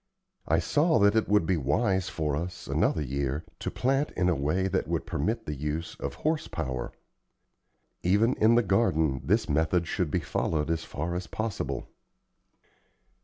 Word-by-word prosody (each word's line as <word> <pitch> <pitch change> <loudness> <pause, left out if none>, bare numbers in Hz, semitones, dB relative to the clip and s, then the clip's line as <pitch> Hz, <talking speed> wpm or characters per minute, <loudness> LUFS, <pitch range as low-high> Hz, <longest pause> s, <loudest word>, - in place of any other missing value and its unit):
I - - +3
saw 150 -1 +2
that 100 0 +4
it 110 - +2
would 105 -4 +4
be 90 +1 +1
wise 95 - +1
for 75 -3 -1
us, 85 +3 -5
another 75 - +1
year, 70 +2 -2 0.2
to - - -3
plant 135 +3 +1
in 90 -1 +3
a 90 - +2
way 75 +8 0
that 95 - -1
would - - -1
permit 110 +10 -2
the 75 - -3
use 75 +3 -3
of - - -4
horse 155 0 -1
power. 65 -2 -4 1.1
Even 105 +7 +3
in 110 +2 +5
the 120 - +4
garden 80 - +2
this 110 +5 +2
method 80 +3 +1
should 90 -4 -1
be - - +1
followed 75 -1 -1
as 80 -1 -1
far 80 +4 -4
as 90 +1 -3
possible. 110 -3 -3
90 Hz, 170 wpm, -28 LUFS, 75-110 Hz, 1.1 s, in